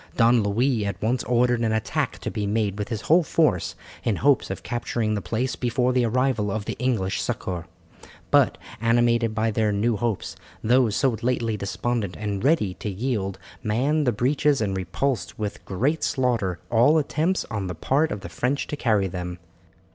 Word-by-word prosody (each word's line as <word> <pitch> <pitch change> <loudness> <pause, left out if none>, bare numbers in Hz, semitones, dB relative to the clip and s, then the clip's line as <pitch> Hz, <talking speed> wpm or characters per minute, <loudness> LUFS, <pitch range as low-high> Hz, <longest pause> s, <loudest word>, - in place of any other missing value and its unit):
Don 115 0 +5
Louis 110 +3 +1
at 100 0 -3
once 120 +3 0
ordered 120 -1 +2
an 115 -2 +1
attack 110 0 -1
to - - -3
be 105 -1 -2
made 105 -1 0
with 105 - -3
his 110 -3 -3
whole 170 +3 +4
force, 150 - +1 0.3
in 115 - +1
hopes 140 +3 +2
of - - -5
capturing 115 -2 -1
the 105 - -1
place 115 +9 -2
before 125 +1 0
the 125 -1 +3
arrival 125 -2 +1
of 100 +1 -3
the - - -2
English 115 -7 0
succour. 90 -8 -3 0.6
But, - - +4 0.2
animated 115 -1 +2
by 110 0 +1
their 110 -1 +1
new 105 +2 +1
hopes, 115 -2 -2 0.3
those 120 -2 +3
so 130 -4 +2
lately 115 -2 0
despondent 105 0 -2
and 105 -1 -3
ready 140 - +2
to 105 - -3
yield 100 -2 -2 0.2
manned 130 +6 +1
the - - +5
breaches 140 +5 +2
and 100 -3 -1
repulsed 100 +7 -2
with 105 -2 -4
great 135 - 0
slaughter 115 -9 0
all 120 +7 +5
attempts 160 +5 0
on 100 -4 -2
the 90 - -4
part 140 - +1
of 105 - -4
the 85 - -7
French 125 +11 -1
to - - -2
carry 110 -8 +2
them. 90 -1 -5
115 Hz, 180 wpm, -24 LUFS, 105-125 Hz, 0.6 s, Don